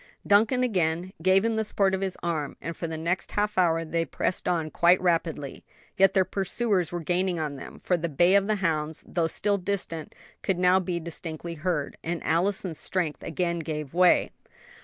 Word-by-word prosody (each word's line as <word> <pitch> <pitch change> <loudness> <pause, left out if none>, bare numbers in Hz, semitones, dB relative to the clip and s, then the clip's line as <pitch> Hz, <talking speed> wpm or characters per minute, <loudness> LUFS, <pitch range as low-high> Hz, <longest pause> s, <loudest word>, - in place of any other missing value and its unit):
Duncan 225 +5 +4
again 180 -5 0
gave 190 +4 +4
him 225 -1 0
the 220 - +1
support 200 -2 +1
of 190 - -1
his 190 -2 -2
arm, 160 -4 -2
and 165 +2 -5
for 165 - -4
the 160 0 -5
next 170 +3 -2
half 210 +1 0
hour 165 -3 +2
they 165 +1 0
pressed 180 - -2
on 165 -3 0
quite 175 +2 +4
rapidly; 165 -5 -1 0.3
yet 195 -1 +4
their 190 -1 +4
pursuers 195 -3 0
were 175 -1 -3
gaining 180 +2 0
on 150 -3 -3
them, 135 - -9
for 180 - 0
the 170 0 -3
bay 175 +5 +3
of 200 0 +4
the 215 - +2
hounds, 160 -5 -1
though 170 -2 0
still 200 +4 0
distant, 180 -4 -4 0.3
could 190 -3 0
now 180 +1 +4
be 180 -2 -2
distinctly 170 0 -6
heard, 165 -3 -2
and 170 0 -3
Allison's 175 0 0
strength 175 -5 -2
again 170 +1 -2
gave 150 -3 -5
away. 180 0 +4
175 Hz, 190 wpm, -26 LUFS, 165-190 Hz, 0.3 s, Duncan